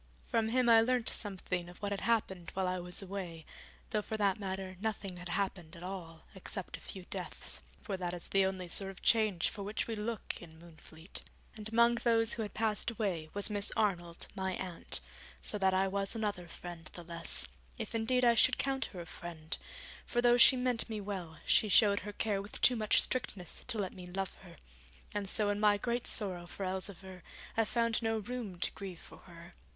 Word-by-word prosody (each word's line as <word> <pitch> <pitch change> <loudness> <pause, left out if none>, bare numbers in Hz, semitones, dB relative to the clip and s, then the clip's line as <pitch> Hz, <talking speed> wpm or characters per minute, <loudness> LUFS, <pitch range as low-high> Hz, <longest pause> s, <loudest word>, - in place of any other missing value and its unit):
From 220 -1 +1
him 250 +1 +3
I 225 -1 +8
learnt 245 0 +3
something 185 -3 -3
of 175 - -12
what 205 0 -2
had 200 - -1
happened 190 -7 +1
while 190 -1 +1
I 185 0 0
was 180 +2 -2
away, 180 -4 -5 0.5
though 215 -1 +2
for 220 +1 -4
that 200 -1 +2
matter 190 -1 -4
nothing 200 -4 -2
had 180 0 -7
happened 180 -3 -1
at 170 - -10
all, 175 -4 -6
except 190 0 -5
a - - -9
few 190 -2 -9
deaths, - - -3 0.2
for 200 -4 -3
that 180 -1 -2
is 175 -1 -4
the 195 0 +4
only 185 -2 -3
sort 195 +3 +1
of 195 - -11
change 215 -7 +3
for 210 - -7
which 205 +2 -1
we 225 - -3
look 220 +1 -3
in 160 -2 -12
Moonfleet. 165 0 -6 0.3
And 215 0 -6
among 235 +1 +5
those 225 -1 +4
who 230 - -2
had 210 -2 -4
passed 220 0 +1
away 195 -9 -2
was 205 +1 +2
Miss 205 0 +2
Arnold, 175 -6 0
my 190 -1 -1
aunt, 180 -2 -5 0.4
so 210 - +1
that 190 -1 +4
I 190 +1 +3
was 195 +2 -1
another 205 -5 -2
friend 170 -1 -8
the 175 - -7
less, 170 0 -3 0.3
if 225 -2 -4
indeed 245 +3 +2
I 235 - +7
should 230 - +5
count 270 -1 +1
her 180 - -7
a - - -7
friend: 160 -1 -5 0.5
for 240 - 0
though 240 0 +6
she 245 - +10
meant 250 -2 0
me 220 -1 -3
well, 190 -6 -5
she 215 - +4
showed 200 0 +6
her 205 - -6
care 205 -2 0
with 205 - -8
too 250 - +6
much 215 -2 +4
strictness 200 -8 -2
to 245 -3 0
let 195 -3 -1
me 180 -1 -9
love 190 +1 -3
her, - - -13 0.6
and 205 -2 -2
so 205 0 +3
in 205 - -1
my 210 -1 +5
great 240 +3 -1
sorrow 185 -5 +1
for 195 +2 -5
Elzevir 190 -1 -3 0.3
I 225 - +3
found 230 +1 +1
no 225 -1 +1
room 215 -3 -4
to - - +1
grieve 185 -4 -7
for - - -13
her. 170 0 -13
200 Hz, 210 wpm, -34 LUFS, 180-220 Hz, 0.6 s, she